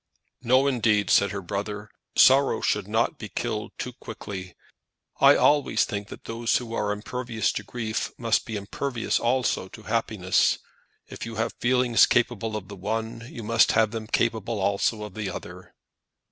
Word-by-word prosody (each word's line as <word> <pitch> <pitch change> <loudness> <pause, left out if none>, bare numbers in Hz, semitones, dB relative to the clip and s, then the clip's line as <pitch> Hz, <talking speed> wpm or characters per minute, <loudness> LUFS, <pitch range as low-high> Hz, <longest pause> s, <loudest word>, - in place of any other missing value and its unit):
"No, 130 +2 +4
indeed," 115 -6 +2
said 100 - +5
her 100 0 -5
brother. 105 +3 -5 0.3
"Sorrow 135 +1 +5
should - - 0
not - - 0
be - - -7
killed - - -3
too - - -5
quickly. 95 -3 -8 0.6
I - - +7
always 145 -7 +3
think 100 0 -5
that - - -11
those 115 +1 0
who 115 -2 -6
are 105 -2 0
impervious 115 +2 -2
to 105 - -4
grief 110 0 -3
must 115 -2 0
be 110 - -4
impervious 115 +4 -2
also 120 -5 0
to 110 +3 -13
happiness. 110 -4 +1 0.5
If - - -7
you 115 - -7
have 110 +1 -1
feelings 125 -1 +4
capable 115 -2 0
of 100 -3 -5
the 100 - -9
one, 110 +4 -4
you 115 - -8
must 115 +1 +4
have 110 -1 +3
them 110 -1 -5
capable 115 -1 0
also 100 +2 0
of 105 -3 -8
the 105 -2 -4
other!" 90 0 -9
110 Hz, 165 wpm, -25 LUFS, 105-120 Hz, 0.6 s, I